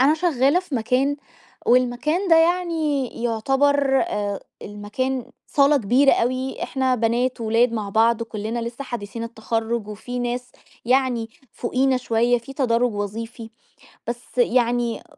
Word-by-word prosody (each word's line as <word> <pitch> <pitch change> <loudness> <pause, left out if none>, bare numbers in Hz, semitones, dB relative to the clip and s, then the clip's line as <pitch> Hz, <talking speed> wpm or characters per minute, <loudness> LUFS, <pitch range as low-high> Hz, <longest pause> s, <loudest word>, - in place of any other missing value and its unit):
أنا 280 +4 +5
شغّالة 310 -1 +2
في 365 -6 -7
مكان، 255 +5 +1 0.5
والمكان 255 +9 +2
ده 330 - +7
يعني 325 -5 +1 0.2
يُعتبر، 270 +4 +2
آآ، 205 -1 -2 0.2
المكان 225 +5 -4 0.2
صالة 285 +1 +4
كبيرة 265 +4 +4
أوي، 255 +2 -1
إحنا 260 -1 0
بنات 240 +2 0
وولاد 230 +2 +2
مع 215 -3 -3
بعض 225 +3 +3
وكلنا 225 +1 -4
لسّه 235 +4 -5
حديثين 230 -2 -5
التخرج 225 -1 -3
وفي 220 +4 -6
ناس 245 0 -3 0.3
يعني 250 -2 +1 0.2
فوقينا 260 +2 +1
شويّة، 240 0 +1
في 235 +4 -11
تدرّج 245 -3 +1
وظيفي، 225 +3 -5 0.6
بس 240 +1 -4
يعني 240 -2 +1
245 Hz, 125 wpm, -22 LUFS, 230-270 Hz, 0.6 s, ده